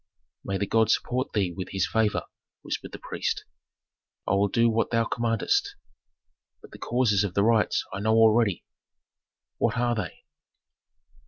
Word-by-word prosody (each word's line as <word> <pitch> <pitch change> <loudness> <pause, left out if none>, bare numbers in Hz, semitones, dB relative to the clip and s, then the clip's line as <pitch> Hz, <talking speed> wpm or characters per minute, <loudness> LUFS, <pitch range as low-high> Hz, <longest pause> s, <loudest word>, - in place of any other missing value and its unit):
"May 95 - -2
the 100 - -1
god 110 +1 +2
support 125 +3 0
thee 95 -5 0
with 95 0 -5
his 95 -1 +1
favor," 110 -2 +1 0.4
whispered - - -5
the - - -7
priest. - - -3 0.8
"I - - +1
will 100 +1 +3
do 115 +4 +2
what 115 0 +1
thou 115 -1 +1
commandest. 115 -2 0 0.8
But - - -16
the - - -12
causes 115 -5 +1
of 95 -3 -4
the 100 - +3
riots 110 -1 +2
I 100 - -4
know 110 +2 +2
already." 110 -3 +3 0.9
"What 115 +1 +1
are 120 0 +1
they?" 105 -7 -5
110 Hz, 155 wpm, -26 LUFS, 100-115 Hz, 0.9 s, will